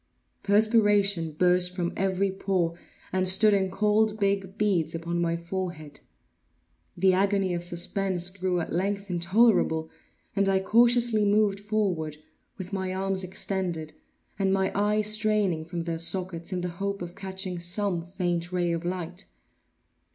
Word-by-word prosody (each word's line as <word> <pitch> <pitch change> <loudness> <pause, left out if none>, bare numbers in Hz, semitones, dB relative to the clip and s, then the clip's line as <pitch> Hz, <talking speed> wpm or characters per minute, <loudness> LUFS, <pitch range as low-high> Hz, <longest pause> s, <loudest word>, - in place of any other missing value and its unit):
Perspiration 205 -5 +3
burst 180 +2 +2
from 175 -2 -2
every 195 0 0
pore, 190 -3 -1 0.4
and 185 0 +2
stood 210 +3 +4
in 190 -1 +1
cold 210 +2 +1
big 195 -1 -1
beads 175 -7 +1
upon 170 +1 -2
my 170 0 0
forehead. 170 -4 -6 1.0
The 190 +1 +4
agony 195 -1 +1
of 170 0 -2
suspense 180 +1 -1
grew 185 -2 -1
at 160 - -5
length 200 +2 -2
intolerable, 175 -3 +2 0.4
and 200 -1 +2
I 190 0 +3
cautiously 235 +1 +3
moved 205 -1 +2
forward, 195 -8 -2 0.4
with 190 0 -8
my 190 -1 -2
arms 190 0 0
extended, 180 -4 -3 0.5
and 195 -1 +2
my 190 0 +1
eyes 210 +1 +1
straining 215 -6 +1
from 170 +1 -4
their 165 -1 -3
sockets, 175 0 -1
in 180 -1 -2
the 180 - -3
hope 200 -2 -2
of 175 0 -8
catching 190 -2 -5
some 175 +1 +1
faint 175 -1 -3
ray 175 -1 0
of 165 0 -2
light. 180 0 -4
190 Hz, 145 wpm, -27 LUFS, 175-200 Hz, 1.0 s, stood